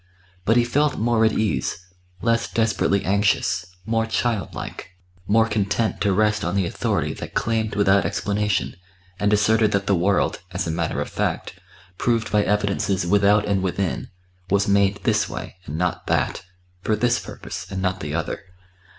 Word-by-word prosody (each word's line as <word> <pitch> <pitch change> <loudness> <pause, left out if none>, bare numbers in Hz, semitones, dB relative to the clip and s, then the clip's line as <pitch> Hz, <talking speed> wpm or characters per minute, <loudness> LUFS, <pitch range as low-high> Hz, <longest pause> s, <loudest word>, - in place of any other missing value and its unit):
But 115 +4 +4
he 120 - +5
felt 145 +5 +1
more 115 0 +2
at 110 - +4
ease, 105 -4 -1 0.4
less 115 0 +1
desperately 110 -3 +1
anxious, 100 +2 +1 0.2
more 115 +1 0
childlike, 110 -5 -3 0.3
more 110 +2 +4
content 105 +1 0
to 100 - +2
rest 105 +2 +2
on 85 +3 -1
the 95 -2 +2
authority - - -1
that - - -8
claimed 110 -2 0
without 100 -1 +4
explanation, 105 -1 -1 0.4
and 105 0 +2
asserted 105 +1 +3
that 100 0 +1
the 100 - +2
world, 95 +1 +1
as - - -1
a - - -1
matter 80 0 -1
of - - -4
fact, - - -3 0.4
proved 115 -2 0
by 105 - +4
evidences 100 -2 0
without 100 +2 +4
and 100 -2 +1
within, 95 0 -2 0.4
was 100 +1 +2
made 100 0 +2
this 105 -4 +2
way - - -7
and 75 - -4
not 90 0 -1
that, - - 0 0.4
for 110 - +1
this 120 +3 +2
purpose - - -8
and 95 - -3
not 95 -1 -1
the 75 +1 -4
other. 80 - -2
105 Hz, 165 wpm, -23 LUFS, 95-110 Hz, 0.4 s, he